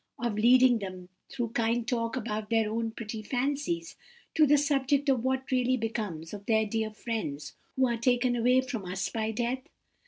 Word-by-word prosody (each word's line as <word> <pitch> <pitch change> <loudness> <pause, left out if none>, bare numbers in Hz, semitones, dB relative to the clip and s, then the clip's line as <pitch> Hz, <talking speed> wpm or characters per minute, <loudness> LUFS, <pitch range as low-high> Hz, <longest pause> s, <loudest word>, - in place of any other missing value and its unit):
—of 235 -2 -1
leading 245 +3 +5
them, 185 -2 -7 0.2
through 240 -4 -3
kind 230 +1 0
talk 230 -2 -1
about 215 -3 -3
their 225 -1 +2
own 225 0 -1
pretty 220 -1 -6
fancies, 285 +8 -2 0.4
to 310 -2 +5
the 295 +1 +6
subject 285 0 +1
of 255 -4 +2
what 265 +1 -1
really 255 0 +2
becomes 210 -8 -4
of 205 -1 -7
the 220 -1 +3
dear 220 +1 -1
friends 210 -10 -4 0.2
who 265 - +3
are 235 -1 -1
taken 245 +1 +2
away 250 +2 +4
from 250 -5 -5
us 185 +1 -2
by 220 -1 -2
death? 240 +3 -1
235 Hz, 180 wpm, -29 LUFS, 220-260 Hz, 0.4 s, the